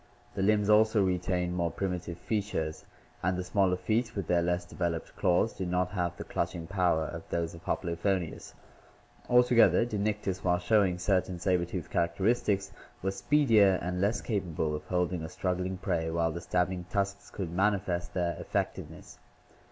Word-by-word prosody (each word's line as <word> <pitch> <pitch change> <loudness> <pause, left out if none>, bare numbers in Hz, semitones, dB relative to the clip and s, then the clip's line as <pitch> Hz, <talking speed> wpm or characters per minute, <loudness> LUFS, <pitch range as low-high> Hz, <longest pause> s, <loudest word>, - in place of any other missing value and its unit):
The - - -3
limbs 105 +1 +3
also 110 0 +5
retain 90 -1 0
more 85 -1 0
primitive 90 -2 -4
features, 95 -7 -3 0.4
and 90 +1 0
the 90 - -2
smaller 95 0 +2
feet, 115 +4 -1
with 100 - -2
their 85 -1 +2
less 90 +1 0
developed 85 -2 -3
claws, 95 +3 +2
did 95 -2 -4
not 90 0 0
have 90 -2 -2
the - - -5
clutching 85 -1 -3
power 85 -3 +1
of 80 +1 -6
those 85 -1 -2
of 85 - -12
Hoplophoneus. 85 0 -2 0.7
Altogether 125 -1 +5
Dinictis, 105 -4 -2
while 90 -1 +2
snowing 95 -1 +2
certain 90 -1 0
saber 90 -1 +1
tooth 90 -1 -6
characteristics, 100 +2 +1 0.3
was 95 +1 -1
speedier 110 -7 +4
and 90 +1 -3
less 105 +4 +1
capable 85 -8 -2
of 75 0 -7
holding 90 -1 -1
a 80 - -5
struggling 90 0 -2
prey 85 -4 -1
while 80 0 +1
the 85 +2 -5
stabbing 90 +1 -1
tusks 100 +1 -2
could 90 -5 -5
manifest 95 -2 0
their 85 -2 0
effectiveness. - - -4
90 Hz, 160 wpm, -30 LUFS, 85-100 Hz, 0.7 s, also